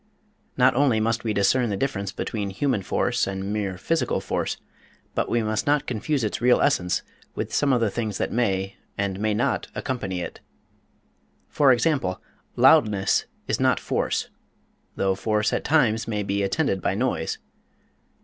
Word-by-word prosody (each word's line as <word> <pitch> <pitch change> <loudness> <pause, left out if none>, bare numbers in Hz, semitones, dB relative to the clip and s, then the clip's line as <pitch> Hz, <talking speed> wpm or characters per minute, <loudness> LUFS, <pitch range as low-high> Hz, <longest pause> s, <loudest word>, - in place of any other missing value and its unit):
Not 125 0 +5
only 130 -4 +3
must 115 +1 0
we 110 - -1
discern 110 +4 +2
the 100 - -1
difference 100 -5 -2
between 105 -1 -3
human 110 +2 0
force 95 - 0
and 95 +1 -3
mere 100 -3 -2
physical 165 - 0
force, - - -2 0.6
but - - -1
we 120 -1 +1
must 110 +3 -1
not 145 0 +2
confuse 130 +3 -1
its 110 - -2
real 125 0 +5
essence 90 -11 +1 0.3
with - - -4
some 145 -1 +2
of 125 -2 +2
the 110 -3 +1
things 110 -2 -3
that - - -2
may 95 -5 0 0.2
and 100 -1 -2
may 105 0 +1
not 125 +6 0
accompany 95 -9 -3
it. - - -6 1.1
For 140 -3 +4
example, 125 - +1 0.4
loudness 100 -2 +4 0.2
is - - 0
not - - +3
force, - - -1 0.6
though 95 0 +1
force 105 +2 0
at - - 0
times 115 -8 +2
may 105 -2 -1
be 100 0 -1
attended 100 0 0
by - - 0
noise. 105 -8 -1
110 Hz, 160 wpm, -24 LUFS, 100-125 Hz, 1.1 s, Not